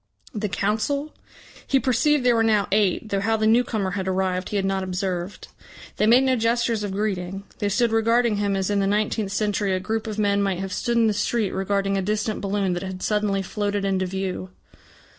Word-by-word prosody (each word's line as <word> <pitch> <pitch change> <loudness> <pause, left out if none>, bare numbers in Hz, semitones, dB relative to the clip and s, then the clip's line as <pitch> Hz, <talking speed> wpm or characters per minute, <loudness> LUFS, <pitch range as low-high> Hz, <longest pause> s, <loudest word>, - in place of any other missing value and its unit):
The 210 -2 -2
Council? 220 +10 -1 0.5
He 270 - +3
perceived 260 +2 +2
there 245 - +5
were 225 - +3
now 215 -3 +2
eight, 205 +1 +1
though 200 - 0
how 220 +3 +1
the 215 - 0
newcomer 220 -4 +2
had 190 0 -3
arrived 185 -1 -1
he - - -4
had 195 -1 +1
not 195 0 0
observed. 185 0 -4 0.5
They 210 - +2
made 245 +4 +6
no 260 -1 +2
gestures 230 -1 +1
of 205 -2 -3
greeting; 195 -2 -3 0.2
they 205 - 0
stood 235 +3 +2
regarding 230 0 +2
him 200 -1 0
as 195 +1 -1
in 205 - +1
the 195 - +1
nineteenth 210 0 0
century 205 -1 0
a - - -1
group 220 +4 -3
of 215 -1 -4
men 200 -1 +2
might 195 -2 0
have 190 0 -4
stood 235 -1 -1
in 230 - +4
the 215 - +2
street 215 -1 0
regarding 195 0 0
a - - -1
distant 215 +2 -2
balloon 200 -2 0
that 175 - -3
had 190 -1 -6
suddenly 210 -2 0
floated 205 +1 -2
into 190 -1 0
view. 190 0 -4
205 Hz, 210 wpm, -23 LUFS, 195-225 Hz, 0.5 s, made